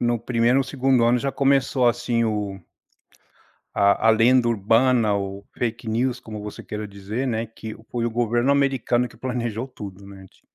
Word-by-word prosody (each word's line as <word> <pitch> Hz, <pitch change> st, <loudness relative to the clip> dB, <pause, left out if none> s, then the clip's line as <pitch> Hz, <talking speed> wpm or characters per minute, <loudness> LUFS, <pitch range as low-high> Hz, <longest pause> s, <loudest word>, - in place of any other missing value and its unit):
no 120 Hz, 0 st, +1 dB
primeiro 120 Hz, +2 st, +1 dB
e -, -, +5 dB
no 135 Hz, -, +1 dB
segundo 130 Hz, -2 st, +2 dB
ano 120 Hz, +1 st, +3 dB
já 135 Hz, +3 st, -1 dB
começou 135 Hz, -2 st, +2 dB
assim 120 Hz, 0 st, 0 dB
o 105 Hz, -3 st, -2 dB, 1.2 s
a 100 Hz, +2 st, +3 dB
a -, -, +9 dB
lenda 120 Hz, +2 st, +4 dB
urbana, 115 Hz, 0 st, +3 dB
o 100 Hz, 0 st, -5 dB
fake 115 Hz, -1 st, -3 dB
news 120 Hz, +3 st, 0 dB
como 110 Hz, -3 st, -8 dB
você 105 Hz, 0 st, -8 dB
queira 105 Hz, 0 st, -6 dB
dizer, 100 Hz, +6 st, -4 dB
né, 115 Hz, -2 st, -1 dB
que 110 Hz, 0 st, -9 dB, 0.2 s
foi 120 Hz, -1 st, -2 dB
o 120 Hz, -, 0 dB
governo 120 Hz, +2 st, +1 dB
americano 135 Hz, -3 st, +1 dB
que -, -, -18 dB
planejou 120 Hz, -1 st, -3 dB
tudo, 100 Hz, -5 st, -10 dB
né 95 Hz, -1 st, -12 dB
ti -, -, -27 dB
115 Hz, 180 wpm, -23 LUFS, 105-125 Hz, 1.2 s, a